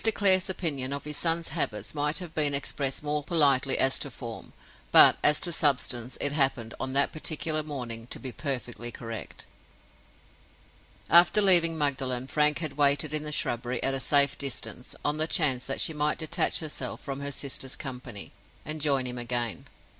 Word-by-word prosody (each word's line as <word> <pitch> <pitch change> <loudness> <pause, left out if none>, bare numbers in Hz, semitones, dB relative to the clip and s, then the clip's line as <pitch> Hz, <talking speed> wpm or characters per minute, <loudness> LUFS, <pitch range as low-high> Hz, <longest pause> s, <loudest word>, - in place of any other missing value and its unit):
Clare's 190 -2 +3
opinion 140 -8 -2
of 140 - -5
his 150 0 -6
son's 165 0 0
habits 140 -9 -3
might 150 0 0
have 175 -3 -7
been 145 -3 0
expressed 140 0 -3
more 150 0 -2
politely 140 -4 +3
as 135 0 +2
to 145 - -5
form; 115 -2 -9 0.4
but, - - +9
as 150 0 +5
to 175 - -2
substance, 130 -6 +1
it 145 - 0
happened, 135 -6 0
on 130 0 -4
that 140 +1 +2
particular 155 0 -2
morning, 120 -6 -6
to - - -7
be 130 - -7
perfectly 120 -3 -5
correct. 115 -5 -8 1.6
After 175 +4 +6
leaving 175 -5 +6
Magdalen, 130 -4 -1
Frank 150 +2 +3
had 155 -4 -5
waited 145 +1 +2
in 155 - +1
the 150 0 -6
shrubbery, 120 -3 -1
at 135 - +1
a 135 - -1
safe 140 0 +2
distance, 125 -3 -5
on 150 +1 0
the 155 +1 +1
chance 135 -7 +1
that 135 - -3
she 160 - +1
might 150 0 0
detach 155 +1 0
herself 155 -2 -5
from 135 -1 -6
her 140 0 -4
sister's 135 -1 -3
company, 125 -6 -8 0.3
and 155 0 -4
join 140 -3 +1
him 125 -1 -4
again. 120 -2 -3
Mr. - - -19
140 Hz, 175 wpm, -26 LUFS, 130-155 Hz, 1.6 s, but